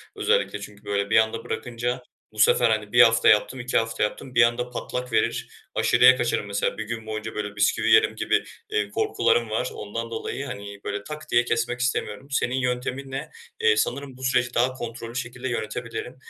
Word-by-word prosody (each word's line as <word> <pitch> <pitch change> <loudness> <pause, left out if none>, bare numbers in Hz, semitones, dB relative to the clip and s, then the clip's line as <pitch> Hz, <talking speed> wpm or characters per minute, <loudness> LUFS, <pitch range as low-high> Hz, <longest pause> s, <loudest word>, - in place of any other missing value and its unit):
Özellikle 475 +2 +1
çünkü 105 0 -11
böyle 100 0 -1
bir - - +4
anda 110 0 +2
bırakınca 120 +2 -3 0.3
bu 110 - -12
sefer, 120 +2 +5
hani, 110 -2 -1
1 120 - +7
hafta 115 -1 +6
yaptım, 110 +5 +3
2 125 +1 0
hafta 115 -1 0
yaptım, 125 +4 -4
bir 125 - +7
anda 120 +1 +1
patlak 125 0 -5
verir, 110 - +1 0.3
aşırıya 130 +1 +6
kaçarım 120 -4 0
mesela, 100 0 -1
1 - - -3
gün 110 0 -5
boyunca 110 0 -5
böyle 105 -1 -4
bisküvi 105 +1 +2
yerim 110 0 +5
gibi, - - +1 0.3
eee, 105 -1 0
korkularım 110 +1 +1
var. 115 +4 -1
Ondan 115 +3 -5
dolayı, 125 +4 -4
hani, 100 -5 -7
böyle, 100 0 -4
"tak" 155 +5 -8
diye 120 0 +4
kesmek 120 +1 -1
istemiyorum. 125 -1 -2
Senin 125 -1 0
yönteminle, 130 +2 -3 0.3
eee, 455 -1 +4
sanırım 140 -2 -2
bu 130 - -11
süreci 125 -1 +1
daha 125 +2 +2
kontrollü 120 -1 -7
şekilde 125 +1 -4
yönetebilirim. 115 +2 -4
120 Hz, 185 wpm, -25 LUFS, 110-125 Hz, 0.3 s, 1